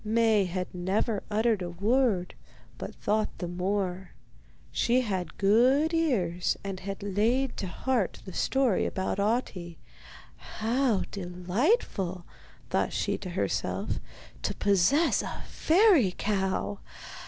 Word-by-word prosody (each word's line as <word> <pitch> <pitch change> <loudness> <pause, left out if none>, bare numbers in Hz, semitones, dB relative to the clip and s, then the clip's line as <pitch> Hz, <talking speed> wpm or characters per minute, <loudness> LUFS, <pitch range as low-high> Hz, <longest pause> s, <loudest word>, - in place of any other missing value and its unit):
Maie 220 -2 +3
had 180 0 -4
never 195 +4 0
uttered 220 -1 +1
a 175 - -3
word, 200 0 +1 0.5
but - - -6
thought 215 +1 -1
the 175 - -4
more. 185 +1 -2 0.6
She 245 +2 +2
had 190 -8 -3
good 255 +10 +4
ears, 200 - +1
and 195 -2 -4
had 195 +1 -6
laid 230 +6 +1
to 195 - -3
heart 230 +4 -1
the 190 - -8
story 265 -7 +1
about 190 +1 -2
Ahti. 200 -6 -1 0.6
'How 230 -1 0
delightful,' 185 - -1 0.5
thought - - +1
she - - 0
to - - -6
herself, - - -2 0.4
'to - - -2
possess 205 - +3
a - - -6
fairy 325 - +4
cow! 190 - -1
200 Hz, 120 wpm, -28 LUFS, 185-240 Hz, 0.6 s, good